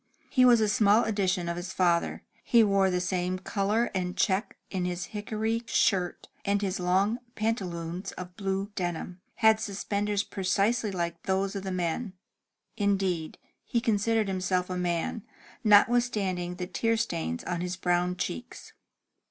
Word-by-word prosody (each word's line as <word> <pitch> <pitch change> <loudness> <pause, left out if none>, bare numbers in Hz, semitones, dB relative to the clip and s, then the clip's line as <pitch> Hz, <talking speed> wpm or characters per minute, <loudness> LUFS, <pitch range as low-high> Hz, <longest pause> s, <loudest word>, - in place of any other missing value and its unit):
He 255 -2 +5
was 240 -2 +7
a 215 - +3
small 210 +2 +4
edition 190 -4 0
of 170 0 -2
his 175 +1 -5
father. 175 -2 +1 0.2
He 235 -2 +5
wore 195 -2 +3
the 180 -1 0
same 180 0 -1
color 205 +4 0
and 180 0 -2
check 195 +2 0
in 185 -2 -1
his 180 0 -2
hickory 220 +2 -1
shirt, 185 -6 +1 0.2
and 200 0 +1
his 195 -2 -2
long 190 +6 +2 0.2
pantaloons 185 -4 -2
of 180 0 -8
blue 195 +1 -2
denim, 175 -1 -4
had 220 -1 +5
suspenders 205 -1 -1
precisely 200 +5 0
like 170 -2 -3
those 190 +1 0
of 200 - -2
the 190 0 -4
men. 185 +4 -2 0.6
Indeed, 195 -6 0 0.3
he 235 - 0
considered 225 -1 +1
himself 185 -1 -1
a - - -2
man, 175 +4 -1 0.4
notwithstanding 205 -5 +3
the 180 0 -4
tear 225 +6 0
stains 80 - -2
on 175 -1 -3
his 180 0 -2
brown 180 0 0
cheeks. 85 - -5
190 Hz, 150 wpm, -28 LUFS, 180-210 Hz, 0.6 s, was